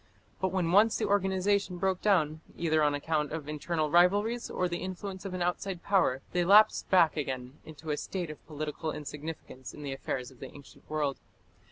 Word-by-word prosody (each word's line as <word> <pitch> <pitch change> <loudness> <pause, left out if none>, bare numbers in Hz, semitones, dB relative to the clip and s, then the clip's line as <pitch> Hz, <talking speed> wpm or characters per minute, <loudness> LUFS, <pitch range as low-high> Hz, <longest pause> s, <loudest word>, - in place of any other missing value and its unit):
But 190 -1 0
when 180 -3 0
once 210 +4 +5
the - - 0
organization 195 -1 +1
broke 190 0 0
down, 160 -7 +2 0.2
either 155 -2 +2
on 145 -1 +3
account 150 0 -1
of 155 -2 -5
internal 155 0 -2
rivalries 205 +7 +3
or 180 - 0
the 175 0 -3
influence 190 +1 -6
of 190 -2 -4
an 180 - -1
outside 180 0 -2
power, 160 -10 +2
they 180 - +1
lapsed 205 +4 +5
back 175 -4 +5
again 130 -2 -4
into 155 0 -7
a 150 - -1
state 175 -2 -4
of 155 - -12
political 155 +1 -4
insignificance 150 -4 -7
in 150 - -9
the 140 -2 -3
affairs 130 -1 -4
of 130 - -19
the - - -8
ancient 140 -1 -15
world. 150 -3 -1
165 Hz, 190 wpm, -30 LUFS, 150-190 Hz, 0.2 s, once